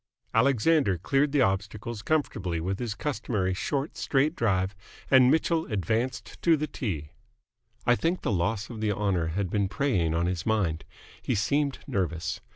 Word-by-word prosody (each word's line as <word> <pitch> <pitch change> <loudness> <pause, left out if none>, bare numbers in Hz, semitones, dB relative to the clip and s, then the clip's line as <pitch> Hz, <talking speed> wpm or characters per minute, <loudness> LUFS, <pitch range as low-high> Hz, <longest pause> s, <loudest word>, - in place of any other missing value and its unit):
Alexander 130 - +3
cleared 135 - +1
the 140 -3 +4
obstacles 105 +3 -2
comfortably 110 - -1
with 95 +4 -2
his 115 -4 -3
customary 110 -9 -1
short, 140 - -2
straight 145 +4 +1
drive, 95 -3 +1 0.4
and 130 -2 +7
Mitchell 160 +2 +2
advanced 110 +6 -2
to 165 -2 +4
the 150 - -1
tee. 85 - -4 0.7
I 120 - +5
think 170 +7 -1
the - - 0
loss 105 +5 -1
of 110 -2 -7
the 110 -1 +1
honour 95 -5 0
had 90 +3 -2
been 100 -2 +1
preying 95 - +1
on 85 +1 +1
his 90 -1 -1
mind. 90 -8 0 0.4
He 125 - -1
seemed 140 +7 +1
nervous. 85 -4 -2
110 Hz, 160 wpm, -27 LUFS, 95-135 Hz, 0.7 s, and